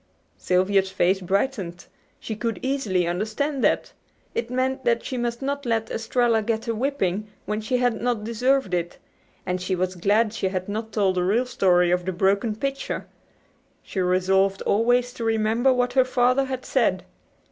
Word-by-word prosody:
Sylvia's 190 +1 +2
face 190 0 +1
brightened. 190 -2 -2 0.3
She 220 - -5
could 230 +1 -2
easily 230 -10 0
understand 220 - -2
that. - - +1 0.4
It 235 - -2
meant 260 +1 -1
that 235 -1 +1
she 260 - -4
must 240 +1 -2
not 280 +1 -2
let 225 -3 -1
Estralla 230 0 +1
get 225 +1 -2
a 230 - 0
whipping 215 -5 -1 0.2
when 210 +1 -2
she 235 +4 0
had 245 -3 0
not 240 -3 0
deserved 235 -1 +1
it; 175 -1 -2 0.5
and 180 0 -2
she 185 +1 -1
was 185 +1 -1
glad 210 +5 +2
she 225 - -1
had 185 -1 -3
not 220 +2 -4
told 195 -3 +1
the 180 - +2
real 220 +7 +2
story 180 -7 +3
of 180 0 +1
the 185 - -2
broken 200 +4 +1
pitcher. 275 +4 -3 0.8
She 195 - -5
resolved 190 +2 +2
always 245 +3 +2
to 235 - -6
remember 225 +3 +2
what 245 -1 +1
her 260 0 +5
father 255 +1 +2
had 260 -1 -5
said. - - +1
220 Hz, 170 wpm, -24 LUFS, 190-245 Hz, 0.8 s, her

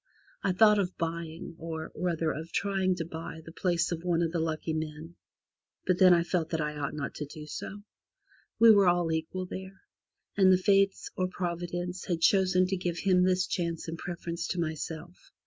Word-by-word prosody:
I - - +2
thought 210 +3 +5
of 185 -2 -2
buying 165 0 -4
or, 160 -1 -5
rather, 165 -3 -1
of 160 +2 -6
trying 190 -2 +1
to 170 -2 -4
buy 160 0 -7
the 165 - -9
place 175 0 0
of 165 -1 -2
one 170 -1 +1
of 165 - 0
the 170 - -1
lucky 160 0 -2
men, 155 +1 -5 0.7
but 185 -1 +1
then 185 -1 +8
I 170 -1 +5
felt 170 -2 -1
that 160 - -1
I 150 0 -2
ought 145 0 -3
not 140 -2 -4
to 150 - -5
do 150 +1 -9
so. 205 +6 -7 0.7
We 230 0 +8
were 200 -3 +6
all 175 -2 +2
equal 160 +3 -2
there, 190 +1 -8 0.5
and 190 -2 +6
the 185 - +6
Fates, 195 +1 +2
or 185 - 0
Providence, 175 0 -4
had 175 -3 -1
chosen 185 +1 +4
to 190 +1 -1
give 175 -1 -2
him 185 -1 +3
this 185 0 +3
chance 170 -2 -3
in 165 - -4
preference 170 0 -5
to 180 - -2
myself. 160 +1 -4
175 Hz, 195 wpm, -29 LUFS, 160-185 Hz, 0.7 s, then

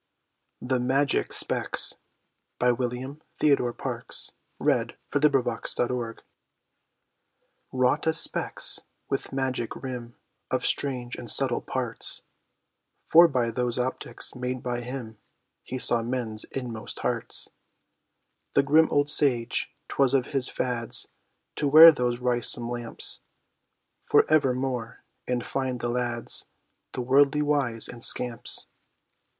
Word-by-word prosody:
much 130 +2 +1
spirits, - - +1 0.6
you - - 0
Have 125 -1 +4
got 125 -1 +1
D.T.'s 125 +1 -6
and 140 +3 -9 0.2
chills!" 130 -5 -1 0.3
[Illustration: - - +1 0.2
THE 150 +1 +4
MAGIC 125 -4 -1
SPECS] 120 - +1 0.2
he 115 - -12 1.7
WROUGHT 145 +6 +2
a 160 - +3
specs, 165 - +2 0.3
with - - -3
magic 130 -3 -2
rim, 125 -3 -7 0.3
of - - -1
strange, 125 -3 -1
and 120 - -6
subtle - - +2
parts, - - -3 0.8
For 170 +2 +7
by 125 -6 0
those 120 0 -1
optics 125 +1 -3
made 125 0 -4
by 120 -1 -2
him, 120 -3 -7 0.4
he 130 - -6
saw 120 -2 +2
men's 115 -2 -2
inmost 120 -4 -6
hearts, - - -2 1.0
The 140 - +5
grim 155 +3 +5
old 145 0 +1
sage, 125 -7 +1 0.2
'twas 135 -1 +2
of 130 -2 +2
his 135 -2 +1
fads, 120 -3 0 0.5
to 150 - 0
wear 160 +4 +10
those 125 -4 -1
wrysome 120 -1 +1
lamps, 120 -1 -5 0.8
For - - +4
evermore, 125 -4 0 0.2
and 125 -1 -1
find 130 -2 -2
the 120 - -2
lads, 120 -1 0 0.5
the - - -3
worldly 140 +3 +3
wise, 135 -6 +1
and 120 -1 -6
scamps. 120 -1 0
125 Hz, 120 wpm, -26 LUFS, 120-135 Hz, 1.7 s, wear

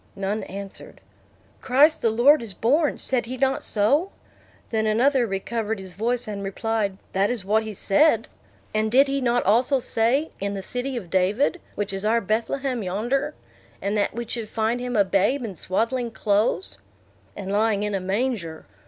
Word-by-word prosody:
None 200 +2 -2
answered. 195 +1 -9 0.6
"Christ 285 +5 +4
the 230 - +3
Lord 245 +7 +5
is 215 -5 -7
born; 290 +6 +2
said 250 -3 -1
he 255 +2 -5
not 270 +1 +1
so?" 280 - +2 0.6
Then 220 -1 +1
another 245 +3 +3
recovered 220 +3 -2
his 190 -2 -9
voice, 235 +4 -1
and 205 -2 -5
replied, 200 0 -2 0.2
"That 195 +2 +2
is 240 -6 -3
what 215 +2 +2
he 220 -1 -6
said." 300 - +3 0.5
"And 215 0 0
did 270 +4 +5
he 275 0 -1
not 245 -1 +1
also 245 +7 +3
say, 250 +5 +1
in 200 +1 -2
the 195 - -5
city 250 +4 -3
of 185 -8 -7
David, 210 - +1
which 205 -1 -3
is 195 0 -4
our 225 +2 +3
Bethlehem 235 +4 -1
yonder. 240 +10 -1 0.4
And 200 +1 -2
that 205 0 0
we 235 0 -3
should 225 -2 -4
find 225 +2 0
him 250 0 -3
a 200 - +5
babe 205 +8 +1
in 205 - -5
swaddling 230 +8 -1
clothes?" 215 - 0 0.6
"And 195 -1 -5
lying 210 0 +1
in 210 0 -2
a 195 - -1
manger." 190 -5 -2
225 Hz, 175 wpm, -24 LUFS, 200-250 Hz, 0.6 s, Lord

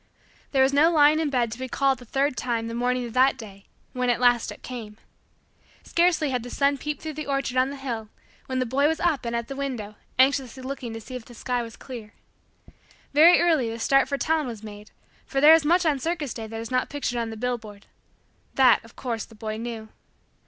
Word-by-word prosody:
There 265 -2 +4
was 270 +1 +2
no 300 +4 +5
lying 305 -1 +5
in 315 -2 0
bed 245 -4 0
to 235 - -7
be 260 - -4
called 270 -1 +1
the 245 - -13
third 270 +3 0
time 230 -1 -2
the 230 - -5
morning 245 +1 0
of 235 - -8
that 260 +2 +4
day; 200 -4 -11 0.3
when 250 -1 0
at 240 - +2
last 245 -2 +3
it - - -12
came. 225 -4 -8 0.9
Scarcely 335 -4 +2
had 250 -1 -1
the 245 - -8
sun 280 +2 +1
peeped 300 0 -5
through 315 -1 -4
the 305 0 -6
orchard 275 -2 -1
on 255 +1 +3
the 280 - -6
hill 235 -6 -5 0.4
when 260 - -3
the 255 - +1
boy 275 +4 +2
was 320 +1 0
up 320 -8 0
and 235 0 -2
at 235 0 -2
the 275 - -6
window 250 -7 -4 0.2
anxiously 260 -1 +2
looking 260 -3 -5
to 225 - -7
see 255 - -11
if 245 -2 -7
the 240 - -14
sky 245 +1 -2
was 230 -1 -8
clear. 230 -5 -10 1.0
Very 320 +5 +7
early 315 -9 +2
the 225 - -5
start 275 +3 +3
for 280 - -1
town 310 -1 0
was 225 -3 -7
made 210 -1 -10 0.4
for 270 - -1
there 300 +3 +8
is 325 -1 +5
much 345 +4 +3
on 295 -4 +2
circus 310 -3 -2
day 225 -2 -6
that 225 +1 -6
is 230 +2 -7
not 255 0 0
pictured 265 -4 -2
on 230 -1 -2
the 225 - -7
billboards 220 -4 -4 0.7
that, 255 -4 +5
of 230 - -17
course, 235 -4 -3
the 225 - -17
boy 215 0 -5
knew. 225 -1 -6
255 Hz, 230 wpm, -25 LUFS, 230-280 Hz, 1.0 s, there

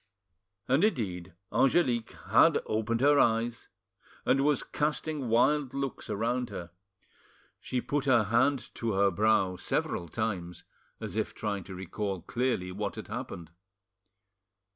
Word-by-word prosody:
And 135 +7 +3
indeed 95 - -1 0.2
Angelique 125 -5 +2 0.2
had - - +6
opened 110 +2 -1
her 145 +1 +5
eyes 115 +1 +1 0.6
and 135 - +3
was 145 -1 +2
casting 150 -3 -2
wild 135 +3 +2
looks 140 -2 -4
around 120 +4 -1
her; 85 -4 -7 0.9
she 125 -1 -2
put 145 +2 -1
her 125 -5 +5
hand 120 +5 +1
to 115 -2 -2
her 100 0 +3
brow 100 -4 +2
several 85 - -2
times, 90 -2 -3 0.4
as - - -5
if - - -2
trying 100 -3 -3
to 95 - -8
recall 95 0 -4
clearly 120 -5 -1
what - - -3
had - - -8
happened. 85 -2 -6
115 Hz, 130 wpm, -29 LUFS, 95-130 Hz, 0.9 s, had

